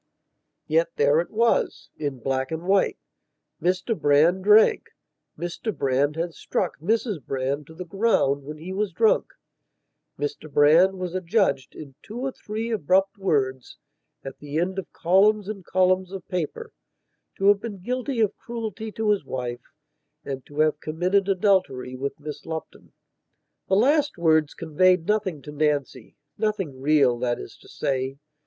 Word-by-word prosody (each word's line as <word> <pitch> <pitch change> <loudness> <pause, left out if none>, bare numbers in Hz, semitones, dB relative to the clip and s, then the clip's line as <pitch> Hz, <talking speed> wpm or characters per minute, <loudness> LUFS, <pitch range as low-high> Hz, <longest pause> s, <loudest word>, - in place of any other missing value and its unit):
Yet - - +2
there 480 +1 +4
it - - -2
wasin 155 - -1
black 130 0 -1
and 160 +1 -4
white. 195 +1 +2 0.6
Mr 185 +5 0
Brand 160 +4 +3
drank; 210 +2 +5 0.5
Mr 175 +5 -4
Brand 140 +2 +1
had 170 +1 -3
struck - - -3
Mrs 205 - -1
Brand 135 +3 -2
to 160 - -13
the 180 +2 -7
ground 180 -8 +1
when 150 +2 -8
he 175 +5 -7
was 205 0 -1
drunk. 220 +4 +3 0.9
Mr 145 +1 -5
Brand 165 +7 +5
was 180 -2 -4
adjudged, 185 - 0
in 140 -3 -10
two 220 - -9
or 265 +2 -2
three 220 0 -5
abrupt 195 +1 +1
words, 130 -9 -1 0.5
at 135 - -8
the 145 +1 -5
end 185 +3 0
of 185 - -8
columns 200 +4 +3
and 205 -3 -6
columns 185 +1 +1
of 195 -2 -8
paper, 180 - -4 0.7
to 195 +1 +4
have 205 -1 +5
been 220 -4 -6
guilty 250 +5 -2
of 215 - +1
cruelty 225 -2 -6
to 220 -1 +1
his 205 -5 +1
wife 125 -2 -5 0.5
and 135 -2 -5
to 145 +1 -1
have 155 -1 +2
committed 185 +5 0
adultery 185 -10 +1
with 140 +2 -4
Miss 150 -1 -7
Lupton. 160 -1 -7 0.8
The 190 - +4
last 285 - +3
words 160 -3 +2
conveyed 170 +2 +2
nothing 195 -8 -1
to 150 - -8
Nancynothing 150 - -2
real, 140 -4 +3
that 120 -1 0
is - - -9
to - - -18
say. 135 0 -2
175 Hz, 150 wpm, -24 LUFS, 145-205 Hz, 0.9 s, drank